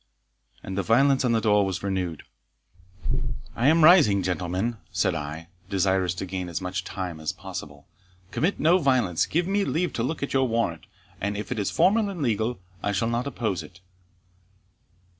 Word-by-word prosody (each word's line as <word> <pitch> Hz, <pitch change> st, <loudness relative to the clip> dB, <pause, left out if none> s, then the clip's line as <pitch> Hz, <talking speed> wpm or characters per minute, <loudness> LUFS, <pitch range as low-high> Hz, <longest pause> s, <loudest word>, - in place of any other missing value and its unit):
And 95 Hz, -, -5 dB
the 100 Hz, -, +1 dB
violence 135 Hz, +7 st, +3 dB
on 125 Hz, -, +2 dB
the 115 Hz, -, +3 dB
door 105 Hz, -2 st, +3 dB
was 95 Hz, -1 st, -3 dB
renewed. 95 Hz, -5 st, -2 dB, 1.3 s
"I 120 Hz, -, +2 dB
am 160 Hz, +2 st, +5 dB
rising, 150 Hz, -, +6 dB
gentlemen," 90 Hz, +6 st, -1 dB
said -, -, +1 dB
I, 75 Hz, +3 st, -5 dB, 0.2 s
desirous 95 Hz, -2 st, +1 dB
to 95 Hz, -, -4 dB
gain 90 Hz, -1 st, -4 dB
as 85 Hz, -, -3 dB
much 90 Hz, 0 st, -3 dB
time 90 Hz, -4 st, -5 dB
as 80 Hz, -, -2 dB
possible 70 Hz, -1 st, -8 dB, 0.4 s
"commit 180 Hz, +6 st, 0 dB
no 170 Hz, +4 st, +4 dB
violence 125 Hz, -, +2 dB
give 170 Hz, +2 st, +1 dB
me 200 Hz, +2 st, +1 dB
leave 180 Hz, -1 st, -1 dB
to -, -, -2 dB
look 140 Hz, +5 st, -2 dB
at 140 Hz, -, -3 dB
your 135 Hz, -1 st, +3 dB
warrant, 110 Hz, -9 st, -1 dB, 0.3 s
and, 100 Hz, +1 st, -1 dB
if 105 Hz, -, -6 dB
it 125 Hz, -, -1 dB
is 100 Hz, -, 0 dB
formal 210 Hz, +2 st, +3 dB
and 180 Hz, -6 st, -4 dB
legal, 110 Hz, -2 st, 0 dB, 0.2 s
I 100 Hz, -, -1 dB
shall 115 Hz, +4 st, 0 dB
not 120 Hz, +3 st, -1 dB
oppose 110 Hz, -8 st, -2 dB
it." 90 Hz, -, -13 dB
105 Hz, 180 wpm, -26 LUFS, 90-135 Hz, 1.3 s, rising